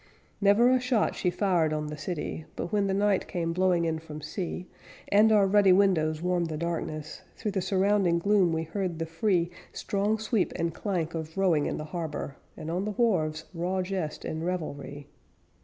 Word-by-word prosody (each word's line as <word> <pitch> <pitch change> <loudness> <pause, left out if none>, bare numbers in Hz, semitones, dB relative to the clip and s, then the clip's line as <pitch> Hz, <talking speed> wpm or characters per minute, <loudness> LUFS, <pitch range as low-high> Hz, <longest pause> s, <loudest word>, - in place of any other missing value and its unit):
Never 210 +5 +5
a 255 - +4
shot 250 -3 +1
she 180 - 0
fired 175 -4 +1
on 155 0 -1
the 150 0 -5
city, 155 0 -4
But, 175 - -4
when 205 -1 +2
the 190 - 0
night 200 -1 +2
came 165 -1 -2
blowing 180 -1 +2
in 160 -1 -1
from 155 -1 -9
sea, 170 +4 -5 0.4
And 215 +2 +5
our 210 -2 +5
ruddy 200 0 +5
windows 165 -5 +2
warmed 180 -1 +1
the 155 - -3
darkness, 155 -2 -4
Through 210 - -3
the 195 -1 -1
surrounding 190 -2 +2
gloom 195 -1 +3
we 160 0 -1
heard 180 0 -3
the 165 - -2
free 170 +1 0 0.2
Strong 205 +2 0
sweep 220 -2 0
and 165 -1 -1
clank 175 -5 -2
of 160 0 -6
rowing 175 -6 +3
in - - -2
the 155 - -4
harbor, 155 -3 -5 0.2
And 160 - -5
on 180 +3 -1
the 210 - -2
wharves 160 -9 +1
raw 185 +2 -1
jest 180 -5 -4
and 160 +1 -3
revelry. 145 -5 -4
175 Hz, 190 wpm, -28 LUFS, 160-200 Hz, 0.4 s, Never